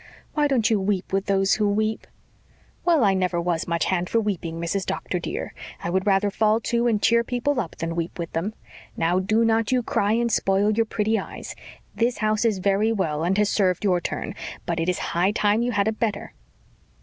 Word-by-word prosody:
Why 295 Hz, -1 st, +2 dB
don't 250 Hz, -6 st, +2 dB
you 215 Hz, -3 st, +2 dB
weep 190 Hz, -1 st, -1 dB
with 195 Hz, +1 st, 0 dB
those 195 Hz, 0 st, +3 dB
who 210 Hz, -1 st, +2 dB
weep?" 215 Hz, +2 st, -1 dB, 0.8 s
"Well, 335 Hz, -6 st, +3 dB
I 195 Hz, -2 st, +4 dB
never 185 Hz, -2 st, 0 dB
was 170 Hz, -1 st, -1 dB
much 170 Hz, 0 st, 0 dB
hand 180 Hz, -1 st, 0 dB
for 230 Hz, -, +2 dB
weeping, 175 Hz, -6 st, -3 dB
Mrs. 170 Hz, +3 st, -1 dB
Doctor, 180 Hz, -, -3 dB
dear. -, -, -5 dB, 0.3 s
I 170 Hz, -, -2 dB
would 190 Hz, +2 st, 0 dB
rather 200 Hz, +1 st, +3 dB
fall 215 Hz, +1 st, +2 dB
to 235 Hz, +1 st, 0 dB
and 220 Hz, -3 st, +2 dB
cheer 235 Hz, 0 st, +4 dB
people 250 Hz, +3 st, -1 dB
up 175 Hz, -9 st, -4 dB
than 165 Hz, 0 st, -3 dB
weep 170 Hz, 0 st, -3 dB
with 170 Hz, -2 st, -5 dB
them. 195 Hz, +7 st, -2 dB, 0.4 s
Now, 170 Hz, +3 st, +2 dB
do 215 Hz, +4 st, +2 dB
not 225 Hz, 0 st, +2 dB
you 250 Hz, -1 st, +2 dB
cry 205 Hz, -1 st, +1 dB
and 235 Hz, 0 st, +1 dB
spoil 195 Hz, +1 st, +2 dB
your 225 Hz, +1 st, +1 dB
pretty 220 Hz, +1 st, 0 dB
eyes. -, -, -7 dB, 0.4 s
This 235 Hz, +1 st, 0 dB
house 215 Hz, +1 st, +1 dB
is 220 Hz, -4 st, +2 dB
very 200 Hz, +3 st, +2 dB
well 165 Hz, -8 st, -1 dB
and 185 Hz, +3 st, +1 dB
has 210 Hz, -1 st, +3 dB
served 185 Hz, -3 st, +1 dB
your 180 Hz, -3 st, +2 dB
turn, -, -, -4 dB, 0.3 s
but 170 Hz, -1 st, -2 dB
it 165 Hz, +2 st, 0 dB
is 180 Hz, -, 0 dB, 0.2 s
high 175 Hz, +3 st, +3 dB
time 210 Hz, +1 st, +2 dB
you 245 Hz, +1 st, 0 dB
had 205 Hz, -2 st, +1 dB
a -, -, +3 dB
better." 215 Hz, -2 st, -3 dB
205 Hz, 215 wpm, -24 LUFS, 180-225 Hz, 0.8 s, I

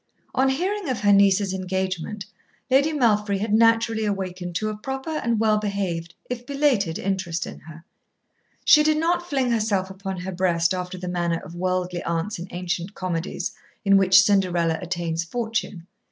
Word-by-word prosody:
On 265 Hz, +1 st, +3 dB
hearing 365 Hz, +5 st, -1 dB
of 255 Hz, -, -2 dB
her 205 Hz, -1 st, +5 dB
niece's 200 Hz, -1 st, +4 dB
engagement, 190 Hz, +1 st, -3 dB, 0.5 s
Lady 280 Hz, +4 st, +4 dB
Malfry 210 Hz, -8 st, +2 dB
had 210 Hz, +1 st, -1 dB
naturally 225 Hz, 0 st, +3 dB
awakened 185 Hz, -4 st, -3 dB
to 215 Hz, +5 st, 0 dB
a 215 Hz, -, -4 dB
proper 265 Hz, +7 st, -5 dB
and 235 Hz, -8 st, 0 dB
well 215 Hz, -1 st, +3 dB
behaved 185 Hz, -5 st, -3 dB
if 245 Hz, -1 st, -4 dB
belated 275 Hz, -, +1 dB
interest 190 Hz, -4 st, -2 dB
in -, -, -9 dB
her. 165 Hz, +1 st, -13 dB, 0.8 s
She 300 Hz, -, +8 dB
did 305 Hz, 0 st, +3 dB
not 345 Hz, +2 st, 0 dB
fling 265 Hz, -4 st, +1 dB
herself 210 Hz, -4 st, 0 dB
upon 190 Hz, 0 st, -5 dB
her 190 Hz, +1 st, -4 dB
breast 175 Hz, -1 st, +1 dB
after 180 Hz, 0 st, -4 dB
the 180 Hz, 0 st, -6 dB
manner 175 Hz, -1 st, 0 dB
of 170 Hz, 0 st, -10 dB
worldly 180 Hz, 0 st, -2 dB
aunts 170 Hz, +4 st, -2 dB
in 175 Hz, -, -6 dB
ancient 180 Hz, +2 st, -4 dB
comedies 175 Hz, -2 st, -3 dB, 0.3 s
in 195 Hz, 0 st, +5 dB
which 195 Hz, 0 st, +6 dB
Cinderella 175 Hz, -5 st, +2 dB
attains 170 Hz, -2 st, -2 dB
fortune. 220 Hz, -2 st, -3 dB
195 Hz, 165 wpm, -24 LUFS, 180-225 Hz, 0.8 s, She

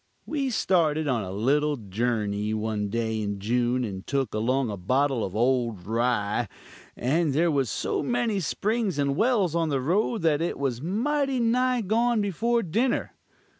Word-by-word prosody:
We 280 Hz, -3 st, -1 dB
started 160 Hz, -9 st, +1 dB
on 120 Hz, -6 st, 0 dB
a 95 Hz, -, -6 dB
little 145 Hz, +8 st, +1 dB
jurney 105 Hz, -1 st, -1 dB
one 105 Hz, -1 st, -2 dB
day 110 Hz, 0 st, -1 dB
in 100 Hz, -1 st, -2 dB
June, 120 Hz, +4 st, +1 dB
and 95 Hz, -4 st, -6 dB
took 135 Hz, -5 st, -1 dB
along 120 Hz, +3 st, 0 dB
a -, -, -3 dB
bottle 130 Hz, +6 st, +1 dB
of 95 Hz, -, -4 dB
"old 120 Hz, -5 st, +1 dB
rye," 115 Hz, 0 st, 0 dB, 0.5 s
and 150 Hz, +4 st, +1 dB
there 165 Hz, +4 st, +2 dB
was 135 Hz, -5 st, +1 dB
so -, -, -1 dB
many 240 Hz, -4 st, 0 dB
springs 205 Hz, +2 st, -1 dB
and 140 Hz, -1 st, +1 dB
wells 215 Hz, -, +2 dB
on 165 Hz, -1 st, +1 dB
the 140 Hz, -2 st, 0 dB
road 190 Hz, -, 0 dB
that 155 Hz, -2 st, +2 dB
it 170 Hz, -, -1 dB
was 130 Hz, -3 st, -2 dB
mighty 265 Hz, -, 0 dB
nigh 250 Hz, +1 st, +2 dB
gone 230 Hz, +3 st, +1 dB
before 230 Hz, +4 st, 0 dB
dinner. 230 Hz, +9 st, 0 dB
140 Hz, 165 wpm, -26 LUFS, -, 0.5 s, there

